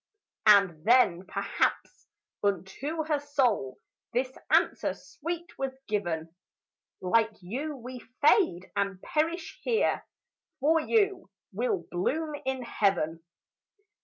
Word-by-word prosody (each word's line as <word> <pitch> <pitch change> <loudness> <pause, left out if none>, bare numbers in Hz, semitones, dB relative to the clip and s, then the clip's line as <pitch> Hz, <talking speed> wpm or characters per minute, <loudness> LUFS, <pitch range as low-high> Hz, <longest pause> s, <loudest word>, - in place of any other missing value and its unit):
And 195 -7 +6
then 200 -6 +4
perhaps - - -1 0.4
unto 200 - -1
her 305 -2 +1
soul 255 - 0 0.4
This 255 +2 -1
answer - - +2
sweet 340 +2 -6
was 265 -1 -3
given, 170 -6 -2 0.7
"Like 225 +4 +2
you 275 - -4
we 250 0 -8 0.2
fade 290 - +3
and 200 -2 -1
perish 325 +2 -1
here; 455 -2 +1 0.6
For 315 +4 +4
you 400 +1 +1 0.2
we'll 455 -6 -1
bloom 300 - -1
in 265 -1 -1
heaven." 175 -8 0
255 Hz, 105 wpm, -29 LUFS, 195-310 Hz, 0.7 s, And